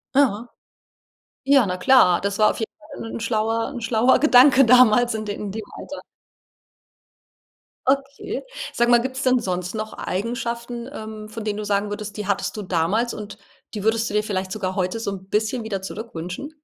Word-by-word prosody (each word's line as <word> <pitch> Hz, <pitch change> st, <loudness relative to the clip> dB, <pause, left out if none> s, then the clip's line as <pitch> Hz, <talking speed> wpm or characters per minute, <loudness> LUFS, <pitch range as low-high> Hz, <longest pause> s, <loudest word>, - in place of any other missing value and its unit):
Ja. 245 Hz, -5 st, +2 dB, 1.0 s
Ja, 275 Hz, -5 st, +5 dB
na 180 Hz, 0 st, -2 dB
klar, 180 Hz, -4 st, +5 dB
das 200 Hz, +1 st, -2 dB
war 215 Hz, -, +5 dB
auf -, -, -4 dB
jeden 225 Hz, -, -3 dB
Fall 225 Hz, -, -9 dB
'n -, -, -5 dB
schlauer 225 Hz, 0 st, 0 dB
'n 245 Hz, -, -5 dB
schlauer 230 Hz, +2 st, +3 dB
Gedanke 270 Hz, -2 st, +7 dB
damals 245 Hz, 0 st, +5 dB
in 215 Hz, -, -3 dB
de 205 Hz, -1 st, -4 dB
in 205 Hz, -1 st, -5 dB
dem 220 Hz, +2 st, -5 dB
Alter. 290 Hz, -, -8 dB, 1.9 s
Okay. 275 Hz, +1 st, -1 dB, 0.3 s
Sag 240 Hz, -, +1 dB
mal, 240 Hz, -1 st, +6 dB
gibt 260 Hz, +1 st, -4 dB
es 270 Hz, -, -2 dB
denn 255 Hz, -1 st, +3 dB
sonst 180 Hz, -2 st, -3 dB
noch 215 Hz, 0 st, -4 dB
Eigenschaften, 235 Hz, +3 st, -4 dB
ähm, 215 Hz, -3 st, -8 dB
von 225 Hz, 0 st, -7 dB
denen 210 Hz, -1 st, -2 dB
du 215 Hz, -, -4 dB
sagen 205 Hz, 0 st, 0 dB
würdest, 205 Hz, 0 st, -6 dB
die 210 Hz, -2 st, -5 dB
hattest 200 Hz, -1 st, -1 dB
du 215 Hz, -, -4 dB
damals 190 Hz, +6 st, 0 dB
und 210 Hz, -1 st, -8 dB, 0.4 s
die 210 Hz, -, -5 dB
würdest 225 Hz, +1 st, +1 dB
du -, -, -7 dB
dir 210 Hz, 0 st, +2 dB
vielleicht 190 Hz, -3 st, -3 dB
sogar 190 Hz, -3 st, -3 dB
heute 185 Hz, +3 st, -1 dB
so 200 Hz, -, -2 dB
'n 190 Hz, -1 st, -8 dB
bisschen 220 Hz, +3 st, 0 dB
wieder 200 Hz, -3 st, -4 dB
zurückwünschen? 190 Hz, -, -6 dB
220 Hz, 190 wpm, -22 LUFS, 200-240 Hz, 1.9 s, Gedanke